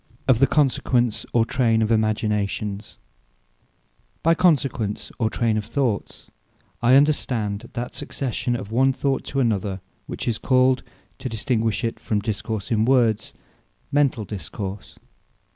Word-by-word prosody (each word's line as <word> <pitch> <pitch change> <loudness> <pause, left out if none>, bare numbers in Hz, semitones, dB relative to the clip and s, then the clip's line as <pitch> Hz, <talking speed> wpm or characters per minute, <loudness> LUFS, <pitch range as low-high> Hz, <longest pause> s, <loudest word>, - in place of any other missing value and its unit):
OF 130 -4 +4
THE 135 - +5
CONSEQUENCE 125 -4 +1
OR 115 -1 +3
TRAYNE 115 -3 +2
OF 110 - 0
IMAGINATIONS 105 -2 -1 1.3
By 165 - +5
Consequence, 140 - +1
or 110 -2 +2
Trayne 115 -1 0
of 105 - -2
Thoughts, 115 -4 -2 0.6
I 120 +2 +5
understand 120 -7 +1
that 120 +1 -4
succession 125 -2 -3
of 110 -3 -6
one 130 +3 +3
Thought 135 0 -1
to 135 - -2
another, 100 -6 0 0.3
which - - -5
is 115 -2 0
called 130 -1 +3 0.4
(to 130 - -4
distinguish 115 -1 -1
it 115 - -2
from 105 - -1
Discourse 110 0 -4
in 110 -1 +3
words) 115 -4 +2 0.6
Mentall 140 -7 +2
Discourse. 100 0 -7
115 Hz, 130 wpm, -23 LUFS, 110-130 Hz, 1.3 s, THE